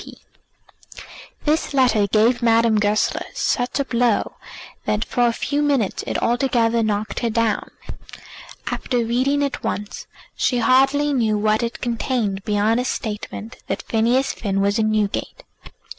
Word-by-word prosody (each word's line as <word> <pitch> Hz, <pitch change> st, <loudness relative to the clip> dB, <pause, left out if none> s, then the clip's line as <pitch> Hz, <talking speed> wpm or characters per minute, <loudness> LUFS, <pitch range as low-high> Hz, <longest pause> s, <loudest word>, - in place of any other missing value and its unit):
G. -, -, -12 dB, 0.8 s
P." -, -, -10 dB, 0.4 s
This 300 Hz, -1 st, 0 dB
letter 245 Hz, -6 st, +3 dB
gave 225 Hz, +4 st, +2 dB
Madame 230 Hz, -2 st, +3 dB
Goesler 210 Hz, +1 st, +1 dB
such 245 Hz, +3 st, -1 dB
a 280 Hz, -, 0 dB
blow 235 Hz, -3 st, 0 dB, 0.5 s
that 215 Hz, +1 st, 0 dB
for 245 Hz, -1 st, +1 dB
a -, -, +2 dB
few 285 Hz, +5 st, -2 dB
minutes 275 Hz, -9 st, 0 dB
it -, -, -1 dB
altogether 235 Hz, -2 st, +1 dB
knocked 215 Hz, -1 st, -1 dB
her 235 Hz, -, -1 dB
down. 225 Hz, -1 st, 0 dB, 1.0 s
After 245 Hz, -2 st, -1 dB
reading 265 Hz, +5 st, +1 dB
it 280 Hz, -2 st, -3 dB
once 210 Hz, 0 st, -4 dB, 0.3 s
she 250 Hz, -, +1 dB
hardly 270 Hz, +4 st, +3 dB
knew 220 Hz, -5 st, +1 dB
what 215 Hz, +1 st, +1 dB
it 235 Hz, 0 st, -4 dB
contained 230 Hz, -4 st, -1 dB
beyond 210 Hz, +2 st, +1 dB
a 250 Hz, -, -1 dB
statement 220 Hz, 0 st, -5 dB
that -, -, -3 dB
Phineas 240 Hz, +4 st, +1 dB
Finn 195 Hz, -3 st, -2 dB
was 200 Hz, +2 st, +1 dB
in 215 Hz, 0 st, +2 dB
Newgate. 210 Hz, -2 st, -2 dB
230 Hz, 145 wpm, -21 LUFS, 215-255 Hz, 1.0 s, letter